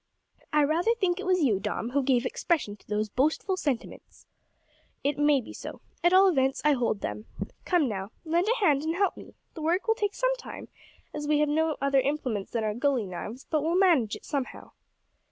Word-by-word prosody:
"I 300 Hz, 0 st, +4 dB
rather 340 Hz, +10 st, +2 dB
think 370 Hz, -5 st, 0 dB
it 390 Hz, -, -5 dB
was 365 Hz, -3 st, +3 dB
you, 215 Hz, -8 st, +2 dB
Dom, 225 Hz, +4 st, -3 dB
who 280 Hz, +2 st, +2 dB
gave 255 Hz, -2 st, +2 dB
expression 255 Hz, -, -1 dB
to -, -, -26 dB
those 210 Hz, +1 st, -1 dB
boastful 305 Hz, -, 0 dB
sentiments." 280 Hz, -10 st, -4 dB, 0.8 s
"It 285 Hz, +1 st, 0 dB
may 295 Hz, -2 st, +4 dB
be -, -, -11 dB
so. -, -, -8 dB, 0.2 s
At 345 Hz, -, +5 dB
all 380 Hz, +1 st, +7 dB
events 270 Hz, -6 st, +2 dB
I 300 Hz, -, +6 dB
hold 240 Hz, -7 st, 0 dB
them. 215 Hz, -, -4 dB, 0.4 s
Come, 345 Hz, -6 st, +2 dB
now, 195 Hz, -3 st, -4 dB, 0.2 s
lend 340 Hz, +4 st, +1 dB
a 465 Hz, -4 st, +1 dB
hand 285 Hz, -5 st, +4 dB
and 320 Hz, +2 st, -1 dB
help 390 Hz, +1 st, +1 dB
me. -, -, -13 dB, 0.2 s
The 320 Hz, -, -8 dB
work 345 Hz, +8 st, 0 dB
will 445 Hz, -, +5 dB
take 415 Hz, -3 st, -2 dB
some -, -, +1 dB
time, -, -, -9 dB, 0.4 s
as 295 Hz, -1 st, -4 dB
we 300 Hz, 0 st, +3 dB
have 300 Hz, 0 st, +2 dB
no 315 Hz, +1 st, +1 dB
other 275 Hz, 0 st, +3 dB
implements 260 Hz, -7 st, -2 dB
than 230 Hz, -2 st, -2 dB
our 215 Hz, -1 st, 0 dB
gully 255 Hz, -1 st, +1 dB
knives, 210 Hz, +7 st, -7 dB
but 310 Hz, -2 st, +2 dB
we'll 325 Hz, +3 st, 0 dB
manage 325 Hz, -, +3 dB
it -, -, -12 dB
somehow." 275 Hz, -3 st, -4 dB
295 Hz, 210 wpm, -28 LUFS, 250-345 Hz, 0.8 s, all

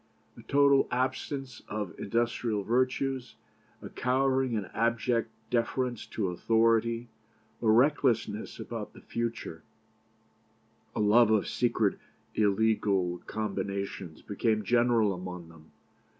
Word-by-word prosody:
A -, -, -12 dB
total 140 Hz, -1 st, +4 dB
absence 130 Hz, 0 st, -2 dB
of 105 Hz, -5 st, -4 dB
industrial 115 Hz, -1 st, -1 dB
virtues, 130 Hz, +2 st, 0 dB, 0.5 s
a -, -, -7 dB
cowering 130 Hz, -1 st, +1 dB
and 100 Hz, -, -3 dB
abject 115 Hz, 0 st, +1 dB, 0.2 s
deference 120 Hz, 0 st, -1 dB
to 100 Hz, -4 st, -2 dB
authority, 115 Hz, +4 st, +2 dB, 0.5 s
a 115 Hz, -, +2 dB
recklessness 120 Hz, -3 st, +2 dB
about 115 Hz, -3 st, -6 dB
the -, -, -14 dB
future, 115 Hz, -8 st, -4 dB, 1.3 s
a -, -, -2 dB
love 110 Hz, +2 st, +5 dB
of 110 Hz, -2 st, +2 dB
secret 115 Hz, -4 st, +1 dB, 0.3 s
illegal 100 Hz, -4 st, +1 dB
combinations, 100 Hz, -5 st, -4 dB
became 110 Hz, +1 st, 0 dB
general 120 Hz, -1 st, +3 dB
among 90 Hz, -2 st, -7 dB
them. 80 Hz, -1 st, -17 dB
115 Hz, 105 wpm, -29 LUFS, 105-125 Hz, 1.3 s, love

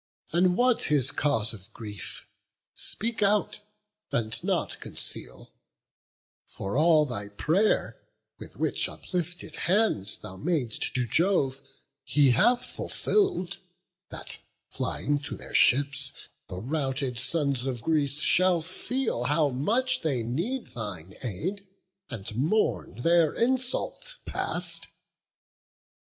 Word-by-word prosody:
and 180 Hz, +1 st, +3 dB
what 250 Hz, -1 st, +3 dB
his 145 Hz, -5 st, +2 dB
cause 115 Hz, -7 st, +1 dB
of 95 Hz, -3 st, -11 dB
grief? 105 Hz, -4 st, -6 dB, 0.5 s
Speak 230 Hz, +1 st, -3 dB
out, 210 Hz, +1 st, +2 dB, 0.5 s
and 110 Hz, -1 st, -1 dB
nought -, -, 0 dB
conceal; -, -, -7 dB, 1.0 s
for 95 Hz, +3 st, -5 dB
all 155 Hz, 0 st, +6 dB
thy 105 Hz, -7 st, -4 dB
pray'r 170 Hz, -, +2 dB, 0.4 s
Which -, -, -10 dB
with -, -, 0 dB
uplifted 175 Hz, -1 st, -3 dB
hands 185 Hz, -, +1 dB
thou 95 Hz, -, -9 dB
mad'st 140 Hz, -, -1 dB
to 125 Hz, -1 st, +2 dB
Jove, 140 Hz, -, +2 dB, 0.4 s
He 135 Hz, +1 st, +4 dB
hath 240 Hz, -, +4 dB
fulfill'd, 385 Hz, -, 0 dB, 0.5 s
that, -, -, -6 dB, 0.3 s
flying 145 Hz, 0 st, 0 dB
to 145 Hz, -, -5 dB
their -, -, -11 dB
ships, 140 Hz, +1 st, +3 dB, 0.4 s
The 90 Hz, -, -6 dB
routed 135 Hz, +1 st, -1 dB
sons 140 Hz, -3 st, 0 dB
of 120 Hz, -3 st, -3 dB
Greece 150 Hz, -2 st, +1 dB
should 180 Hz, -1 st, +3 dB
feel 220 Hz, -, -1 dB
how 150 Hz, +2 st, +3 dB
much 230 Hz, -, +1 dB
They 135 Hz, -8 st, +1 dB
need 175 Hz, -, -2 dB
thine 95 Hz, -6 st, -5 dB
aid, 185 Hz, -, -3 dB, 0.4 s
and 105 Hz, 0 st, -6 dB
mourn 125 Hz, -, +1 dB
their 170 Hz, -2 st, +4 dB
insult 260 Hz, -, 0 dB
past." -, -, -2 dB
150 Hz, 110 wpm, -28 LUFS, 120-185 Hz, 1.0 s, all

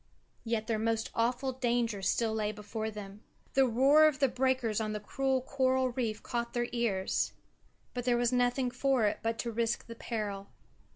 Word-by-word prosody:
Yet 225 Hz, -1 st, -1 dB
their 220 Hz, -1 st, -1 dB
most 225 Hz, 0 st, 0 dB
awful 245 Hz, +3 st, 0 dB
danger 240 Hz, -4 st, 0 dB
still 220 Hz, +3 st, +1 dB
lay 215 Hz, -1 st, 0 dB
before 215 Hz, +1 st, -5 dB
them. 205 Hz, -1 st, -9 dB, 0.3 s
The 265 Hz, -1 st, +4 dB
roar 275 Hz, +6 st, +6 dB
of 300 Hz, -3 st, +1 dB
the 280 Hz, -2 st, +3 dB
breakers 255 Hz, -4 st, 0 dB
on 215 Hz, -1 st, -2 dB
the 210 Hz, -, -3 dB
cruel 265 Hz, +4 st, -1 dB
coral 260 Hz, -1 st, +1 dB
reef 230 Hz, -4 st, -2 dB
caught 235 Hz, -1 st, -3 dB
their 240 Hz, 0 st, 0 dB
ears. 215 Hz, -6 st, 0 dB, 0.6 s
But 245 Hz, -1 st, -4 dB
there 245 Hz, -1 st, +3 dB
was 240 Hz, +1 st, +1 dB
nothing 245 Hz, +1 st, +2 dB
for 255 Hz, -2 st, +2 dB
it 205 Hz, -, 0 dB
but 225 Hz, +1 st, -1 dB
to 235 Hz, -, -3 dB
risk 230 Hz, +1 st, -1 dB
the 230 Hz, -, -8 dB
peril. 210 Hz, -4 st, -4 dB
235 Hz, 180 wpm, -31 LUFS, 220-255 Hz, 0.6 s, roar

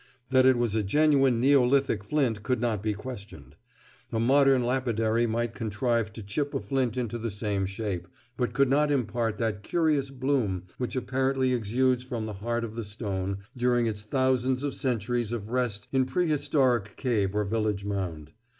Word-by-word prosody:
That 130 Hz, 0 st, +5 dB
it 130 Hz, -1 st, +5 dB
was 120 Hz, -3 st, 0 dB
a 110 Hz, -, +2 dB
genuine 135 Hz, +2 st, +3 dB
neolithic 130 Hz, -3 st, +3 dB
flint 115 Hz, -2 st, 0 dB
could 125 Hz, +2 st, 0 dB
not 115 Hz, -4 st, 0 dB
be 105 Hz, 0 st, 0 dB
questioned. 105 Hz, -, -9 dB, 0.6 s
A 115 Hz, -, -1 dB
modern 135 Hz, +1 st, +4 dB
lapidary 120 Hz, -2 st, +1 dB
might 115 Hz, +1 st, -1 dB
contrive 115 Hz, +1 st, -1 dB
to 110 Hz, -, -8 dB
chip 140 Hz, +9 st, -2 dB
a -, -, +1 dB
flint 125 Hz, +2 st, -1 dB
into 120 Hz, -2 st, -2 dB
the 115 Hz, +1 st, -2 dB
same 100 Hz, -1 st, -2 dB
shape, 95 Hz, -3 st, -4 dB, 0.3 s
but 125 Hz, -1 st, -1 dB
could 140 Hz, -1 st, +3 dB
not 145 Hz, +3 st, +3 dB
impart 120 Hz, -5 st, 0 dB
that 110 Hz, -3 st, -1 dB
curious 150 Hz, 0 st, +1 dB
bloom 130 Hz, -9 st, -1 dB, 0.2 s
which 125 Hz, 0 st, -3 dB
apparently 130 Hz, 0 st, 0 dB
exudes 125 Hz, +2 st, +1 dB
from 120 Hz, -3 st, -4 dB
the 110 Hz, -, -5 dB
heart 115 Hz, +4 st, -2 dB
of 110 Hz, -2 st, -5 dB
the 115 Hz, 0 st, -4 dB
stone 100 Hz, -2 st, -4 dB
during 120 Hz, -1 st, +2 dB
its 105 Hz, -2 st, -2 dB
thousands 130 Hz, +3 st, +1 dB
of 145 Hz, -2 st, -1 dB
centuries 120 Hz, -2 st, -1 dB
of 110 Hz, -2 st, -4 dB
rest 120 Hz, -5 st, -1 dB
in 130 Hz, -1 st, +2 dB
prehistoric 140 Hz, -, +1 dB
cave 105 Hz, -7 st, 0 dB
or 105 Hz, -, +2 dB
village 105 Hz, -1 st, -1 dB
mound. 90 Hz, -7 st, -4 dB
120 Hz, 170 wpm, -27 LUFS, 105-130 Hz, 0.6 s, That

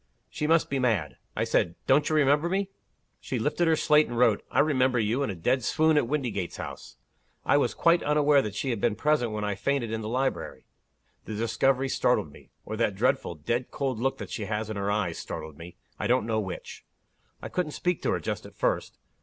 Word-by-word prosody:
She 150 Hz, -, -2 dB
must 165 Hz, 0 st, +3 dB
be 135 Hz, -, 0 dB
mad. 120 Hz, -6 st, 0 dB, 0.2 s
I -, -, 0 dB
said, 85 Hz, -1 st, +1 dB
'Don't 145 Hz, +3 st, +3 dB
you 155 Hz, -, +1 dB
remember 150 Hz, +3 st, +3 dB
me?' 195 Hz, +1 st, -1 dB, 0.5 s
She -, -, -4 dB
lifted 175 Hz, -, +1 dB
her 160 Hz, -, +4 dB
slate, 150 Hz, 0 st, +4 dB
and 120 Hz, -, -5 dB
wrote, 115 Hz, -4 st, +3 dB
'I -, -, -4 dB
remember 130 Hz, -4 st, +2 dB
you, 115 Hz, +4 st, +1 dB
in 140 Hz, -, 0 dB
a 100 Hz, -, -3 dB
dead 125 Hz, +9 st, 0 dB
swoon 155 Hz, +5 st, +3 dB
at 145 Hz, -5 st, +2 dB
Windygates 120 Hz, -, -2 dB
House.' -, -, -8 dB, 0.5 s
I -, -, +4 dB
was -, -, +1 dB
quite 170 Hz, 0 st, +4 dB
unaware 150 Hz, -1 st, +4 dB
that 105 Hz, -5 st, -5 dB
she 130 Hz, +4 st, -1 dB
had 115 Hz, -4 st, -3 dB
been 115 Hz, -3 st, +2 dB
present 145 Hz, -2 st, +1 dB
when 105 Hz, 0 st, -3 dB
I 105 Hz, -1 st, 0 dB
fainted 120 Hz, +3 st, -1 dB
in 110 Hz, 0 st, -2 dB
the 110 Hz, -, -4 dB
library. 130 Hz, +3 st, -2 dB, 0.6 s
The 110 Hz, -, -5 dB
discovery 130 Hz, +4 st, +1 dB
startled -, -, +1 dB
me -, -, -17 dB, 0.2 s
or 110 Hz, -, -4 dB
that 110 Hz, -4 st, +1 dB
dreadful, 100 Hz, -5 st, 0 dB
dead 120 Hz, -, -2 dB
cold 135 Hz, -5 st, -2 dB
look 135 Hz, +3 st, 0 dB
that -, -, -8 dB
she 105 Hz, -, -3 dB
has 110 Hz, +1 st, -3 dB
in -, -, -4 dB
her 100 Hz, 0 st, -2 dB
eyes 100 Hz, -5 st, -1 dB
startled 80 Hz, -2 st, -7 dB
me 85 Hz, +1 st, -10 dB, 0.2 s
I -, -, -1 dB
don't 125 Hz, -2 st, +2 dB
know 110 Hz, -1 st, 0 dB
which. 95 Hz, -4 st, -6 dB, 0.6 s
I -, -, -6 dB
couldn't 170 Hz, -5 st, -2 dB
speak 180 Hz, -1 st, -1 dB
to -, -, -1 dB
her -, -, +1 dB
just -, -, -4 dB
at -, -, -17 dB
first. -, -, -1 dB
125 Hz, 220 wpm, -27 LUFS, 105-150 Hz, 0.6 s, her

